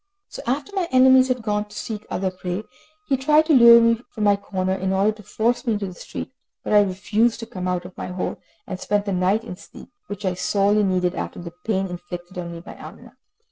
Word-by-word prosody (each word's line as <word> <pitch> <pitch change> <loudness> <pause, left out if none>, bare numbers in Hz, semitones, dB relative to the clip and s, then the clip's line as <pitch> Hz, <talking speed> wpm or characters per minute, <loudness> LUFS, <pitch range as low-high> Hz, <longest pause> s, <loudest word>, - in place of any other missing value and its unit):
So - - -8
after 280 +10 -2
my 370 -3 0
enemies 260 0 +6
had 255 -2 -1
gone 210 -1 -1
to 210 0 -13
seek 215 -2 -6
other 190 0 -1
prey, 185 +2 -4 0.4
he 275 - +2
tried 300 +4 +4
to 315 - +3
lure 235 -3 +9
me 230 0 +3
from 215 - -5
my 205 -1 +5
corner 190 -2 -2
in 190 0 -2
order 195 +3 +3
to 215 0 -12
force 225 +4 -1
me 230 - +3
into 205 -1 -2
the 185 - -7
street. 175 - -8 0.3
But - - -2
I 210 - +7
refused 210 +4 0
to - - -5
come 185 -5 -5
out 180 -1 -2
of 180 - -11
my - - -6
hole, 180 0 -4 0.2
and 185 -2 -6
spent 205 +1 0
the 200 - -1
night 185 +5 +1
in 180 -6 -8
sleep, - - -14 0.2
which 205 0 -6
I 185 - +1
sorely 200 +3 +2
needed, 185 -2 +1
after - - -5
the 170 -1 -8 0.2
pain 195 -3 +1
inflicted 175 0 -7
on 170 -1 -5
me 170 0 -8
by - - -10
Amina. - - -12
205 Hz, 235 wpm, -22 LUFS, 185-230 Hz, 0.4 s, lure